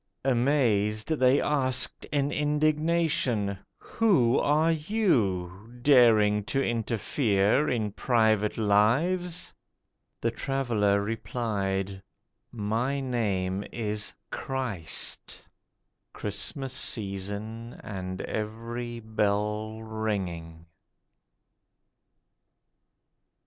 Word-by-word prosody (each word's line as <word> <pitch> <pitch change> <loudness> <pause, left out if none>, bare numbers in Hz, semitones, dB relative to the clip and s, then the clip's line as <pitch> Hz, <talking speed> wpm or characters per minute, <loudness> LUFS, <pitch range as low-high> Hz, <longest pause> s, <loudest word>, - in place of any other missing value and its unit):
Amazed, 120 -4 +2
They 135 -3 +4
asked 130 -3 +1
in 145 -1 0
indignation, 150 - +1 0.2
'Who 155 - +2
are 155 +3 +3
you, 120 - 0
Daring 115 -6 +5
to 135 - -1
interfere 115 0 +1
in 110 -4 -1
private 110 -2 +2
lives?' 135 - +2 0.7
The - - 0
Traveller 110 -7 0
replied, 100 -4 -2 0.5
'My 115 +5 -1
name 100 -7 -1
is 105 -2 -2 0.2
CHRIST.' 115 -12 -2 0.7
(Christmas 115 +6 -4
season, 110 0 -4
and 95 -2 -5
every 115 +2 -4
bell 105 0 -1
ringing.) 95 -7 -4
110 Hz, 70 wpm, -28 LUFS, 105-135 Hz, 0.7 s, Daring